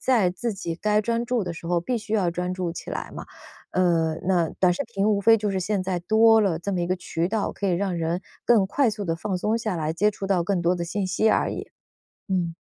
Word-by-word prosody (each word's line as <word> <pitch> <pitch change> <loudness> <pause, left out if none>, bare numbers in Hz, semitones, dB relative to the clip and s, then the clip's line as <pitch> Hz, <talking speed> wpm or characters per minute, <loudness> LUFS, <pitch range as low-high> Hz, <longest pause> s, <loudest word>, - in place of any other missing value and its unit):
在 225 -9 +3
自 230 +6 -3
己 170 -4 -4
该 210 +4 +1
专 230 +2 -1
注 240 -4 0
的 175 - -4
时 165 - -11
候 175 -1 +2
必 245 +8 -2
须 215 0 -6
要 200 -5 +2
专 180 +1 -2
注 180 -2 -3
起 - - -8
来 - - -5
嘛。 - - -6 0.5
呃， 165 -3 +2
那 175 -4 +2
短 180 -1 +4
视 - - -2
频 210 -2 -1
无 205 -1 +2
非 225 +3 +6
就 210 -1 -2
是 190 -1 -1
现 200 +1 -1
在 185 -1 -2
多 220 +4 +5
了 190 -6 +1
这 200 +3 -3
么 180 - 0
一 175 - -1
个 185 - +1
渠 170 -1 -2
道， 215 +1 -1
可 200 - -2
以 - - +2
让 180 0 0
人 165 +2 -1 0.2
更 215 -5 +4
快 260 +3 +2
速 210 -1 -5
地 165 - 0
放 185 +2 -3
松 215 +5 0
下 215 -5 -2
来， 155 -1 -1
接 210 +5 +2
触 195 -1 -6
到 190 -3 +2
更 185 0 0
多 175 +1 +2
的 175 - -3
信 190 +3 -2
息 205 +4 +2
而 - - +1
已。 - - -7 0.6
嗯。 175 -3 0
190 Hz, 280 characters per minute, -25 LUFS, 175-215 Hz, 0.6 s, 非